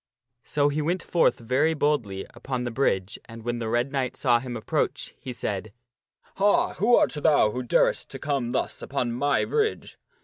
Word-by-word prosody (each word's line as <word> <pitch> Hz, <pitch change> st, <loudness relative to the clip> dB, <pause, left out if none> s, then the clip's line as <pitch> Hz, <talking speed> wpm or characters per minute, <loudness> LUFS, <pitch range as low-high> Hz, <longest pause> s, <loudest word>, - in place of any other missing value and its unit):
So 145 Hz, -1 st, +1 dB
he 150 Hz, +2 st, -1 dB
went 170 Hz, +4 st, -1 dB
forth 160 Hz, -8 st, +2 dB
very 135 Hz, +7 st, +1 dB
boldly 120 Hz, -11 st, 0 dB
upon 125 Hz, +1 st, -4 dB
the 120 Hz, -, -3 dB
bridge, 100 Hz, -7 st, 0 dB
and 115 Hz, -1 st, -11 dB
when 120 Hz, 0 st, -2 dB
the 115 Hz, -1 st, -3 dB
Red 120 Hz, +4 st, 0 dB
Knight 135 Hz, -3 st, -2 dB
saw 120 Hz, -3 st, +3 dB
him 120 Hz, -1 st, -5 dB
approach, 110 Hz, -, -2 dB
he 130 Hz, -, -6 dB
said, 105 Hz, -3 st, -4 dB, 0.3 s
" -, -, -36 dB
Ha! 200 Hz, +1 st, +3 dB
who 235 Hz, +5 st, +4 dB
art -, -, +3 dB
thou 150 Hz, -7 st, +3 dB
who 125 Hz, -, -3 dB
darest 125 Hz, -, +1 dB
to -, -, -7 dB
come 140 Hz, -5 st, -1 dB
thus -, -, -2 dB
upon 125 Hz, -3 st, -2 dB
my 140 Hz, +4 st, +1 dB
bridge?" 440 Hz, -1 st, -1 dB
130 Hz, 190 wpm, -26 LUFS, 120-150 Hz, 0.3 s, who